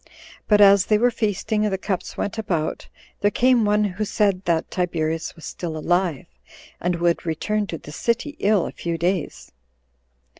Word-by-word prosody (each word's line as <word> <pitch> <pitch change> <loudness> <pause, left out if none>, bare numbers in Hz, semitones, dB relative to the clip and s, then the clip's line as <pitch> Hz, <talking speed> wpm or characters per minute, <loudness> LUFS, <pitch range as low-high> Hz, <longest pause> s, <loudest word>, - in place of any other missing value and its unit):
But 210 -1 +5
as 200 -1 +6
they 215 - +4
were 245 +3 +3
feasting, 215 0 -1
and 210 - +1
the 190 - 0
cups 190 -1 -4
went 205 +2 -3
about, 170 -8 -2 0.3
there 205 - +3
came 245 0 +3
one 210 0 +3
who 205 +1 -2
said 200 -2 +1
that 165 -2 0
Tiberius 165 -3 -2
was 165 - -11
still 165 -3 -5
alive, 175 -1 0 0.5
and 175 0 0
would 170 0 +1
return 205 +6 -1
to 165 - -5
the 150 - -11
city 235 - -1
in 205 - +2
a 185 - 0
few 170 -1 -4
days. 175 +1 -2
190 Hz, 175 wpm, -23 LUFS, 170-210 Hz, 0.5 s, as